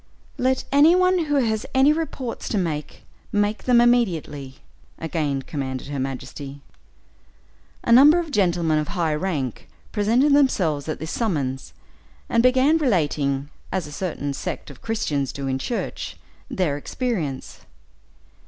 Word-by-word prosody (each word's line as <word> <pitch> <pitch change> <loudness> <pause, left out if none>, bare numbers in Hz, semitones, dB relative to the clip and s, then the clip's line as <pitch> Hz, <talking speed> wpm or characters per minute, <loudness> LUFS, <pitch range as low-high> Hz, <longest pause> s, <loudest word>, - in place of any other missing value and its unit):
"Let 260 +1 +1
any 295 +5 +6
one 365 -2 +3
who 290 -1 0
has 220 -5 +1
any 270 +3 +6
reports 290 -6 -4
to 215 - 0
make, 155 -5 -3 0.3
make 205 +1 0
them 245 -2 +5
immediately," 170 - +1 0.4
again 150 -5 -2
commanded 130 -2 -5
her 140 -1 -3
majesty. 135 +1 -6 1.2
A - - 0
number 285 +7 +8
of 335 -3 -2
gentlemen 170 - +2
of 150 - -2
high 170 -5 -1
rank, 150 -6 -3 0.2
presented 235 +7 +3
themselves 175 - +2
at 155 - -2
this 160 +1 -6
summons, 140 - -2 0.6
and 230 - +3
began 260 +6 +4
relating, 145 - 0 0.2
as 185 -3 -1
a 150 - -9
certain 145 -3 -3
sect 140 - -5
of 140 - -15
Christians 150 - -1
do 140 - -6
in 130 0 -1
church, 235 - -4 0.3
their 160 -7 0
experience! 160 - -3
180 Hz, 135 wpm, -23 LUFS, -, 1.2 s, number